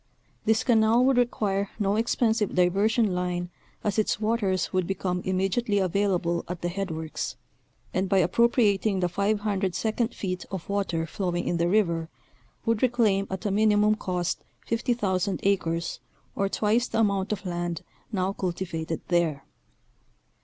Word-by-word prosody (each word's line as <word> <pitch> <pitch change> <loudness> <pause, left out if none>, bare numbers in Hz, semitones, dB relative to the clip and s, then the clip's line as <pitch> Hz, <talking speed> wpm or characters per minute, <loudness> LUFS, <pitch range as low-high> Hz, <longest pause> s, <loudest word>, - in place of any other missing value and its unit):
This 220 0 +3
canal 230 0 +4
would 265 -1 +3
require 205 -5 +1
no 200 -1 +1
expensive 225 -1 +1
diversion 200 +4 +3
line, 180 0 -2 0.3
as 210 +1 0
its 215 - +1
waters 210 -5 0
would 185 -2 +1
become 180 -2 -2
immedi 190 +4 0
ately 205 -4 +1
available 180 -2 0
at 175 -1 -6
the 175 - 0
headworks, 165 -4 -4 0.6
and 185 +1 0
by 195 - +3
appropriating 205 +1 +3
the 180 - +2
500 200 0 0
second 225 +1 -1
feet 185 -2 -3
of 190 -3 -6
water 195 -5 -1
flowing 175 +1 -2
in 175 - +1
the 170 0 +2
river, 170 -5 +1 0.6
would 230 -2 +1
reclaim 220 -6 +2
at 190 +2 -5
a 205 - +1
minimum 210 +1 +4
cost 180 -4 -2 0.2
50,000 205 -6 0
acres, 170 -4 0 0.4
or 195 0 0
twice 220 +4 +1
the - - -3
amount 200 -3 +1
of 210 -1 -3
land 175 -2 -3 0.3
now 190 -2 0
cultivated 170 -4 -3
there. 165 -5 +1
195 Hz, 145 wpm, -26 LUFS, 180-215 Hz, 0.6 s, canal